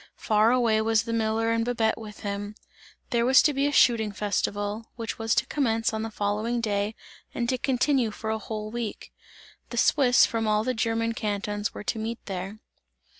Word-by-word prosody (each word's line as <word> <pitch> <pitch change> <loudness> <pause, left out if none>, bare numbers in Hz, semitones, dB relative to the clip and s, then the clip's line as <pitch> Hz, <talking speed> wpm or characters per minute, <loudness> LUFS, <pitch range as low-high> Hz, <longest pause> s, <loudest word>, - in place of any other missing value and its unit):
Far 215 +1 +3
away 230 -3 +3
was 225 0 +2
the 230 0 -4
miller 225 0 +1
and 230 0 +1
Babette 230 -2 +1
with 215 -2 -10
him; 205 +1 -4 0.6
there 235 -1 +2
was 260 +2 +6
to 295 - +3
be 275 +1 +1
a - - 0
shooting 230 -6 +4
festival, 205 +1 -2
which 230 -1 -5
was 225 0 +1
to - - +2
commence 225 -6 0
on 220 - -2
the 225 - -3
following 215 +3 -1
day 210 -1 -1 0.4
and 235 - -1
to 255 - +1
continue 260 -2 +1
for 220 +1 -5
a 220 - -1
whole 215 0 -5
week. 235 -2 -5 0.6
The 240 - -6
Swiss 250 -1 +5
from 225 -1 -2
all 215 0 +2
the 255 - 0
German 230 0 0
cantons 205 -1 -3
were - - -6
to 220 - -2
meet 225 +1 -3
there. 195 +2 -5
225 Hz, 190 wpm, -26 LUFS, 210-235 Hz, 0.6 s, was